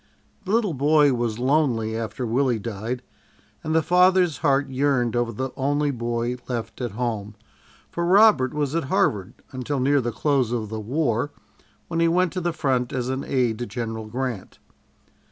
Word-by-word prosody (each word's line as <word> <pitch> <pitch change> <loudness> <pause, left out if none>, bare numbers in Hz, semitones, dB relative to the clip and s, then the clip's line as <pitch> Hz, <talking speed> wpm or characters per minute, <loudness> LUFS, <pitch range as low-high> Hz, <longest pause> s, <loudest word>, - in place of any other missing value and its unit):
The 190 - -3
little 215 -5 +2
boy 145 0 +4
was 120 -3 -1
lonely 125 -4 +1
after 115 +2 -4
Willie 125 +1 +1
died, 115 +3 -5 0.6
and 160 +1 -1
the 160 - +3
father's 180 -2 +4
heart 140 -2 +2
yearned 130 -3 0
over 120 -1 0
the 130 +4 -4
only 145 +2 0
boy 120 0 -2
left 115 -1 -5
at 120 -5 -3
home, 110 -3 -3 0.6
for 170 - -2
Robert 185 - +5
was 145 -2 -2
at 165 -3 -1
Harvard 100 -7 0 0.2
until 130 +2 -3
near 140 +2 +3
the 120 -1 -2
close 130 +1 +1
of 115 -3 -2
the 110 0 -4
war, 125 +2 -1 0.6
when 165 -1 -2
he 165 - +4
went 175 +1 +2
to 185 - -2
the 175 0 0
front 130 -6 0
as 125 -1 -2
an 130 +1 -2
aide 120 -4 0
to 120 - -3
General 115 -3 -5
Grant. 120 -3 -4
130 Hz, 170 wpm, -24 LUFS, 115-150 Hz, 0.6 s, Robert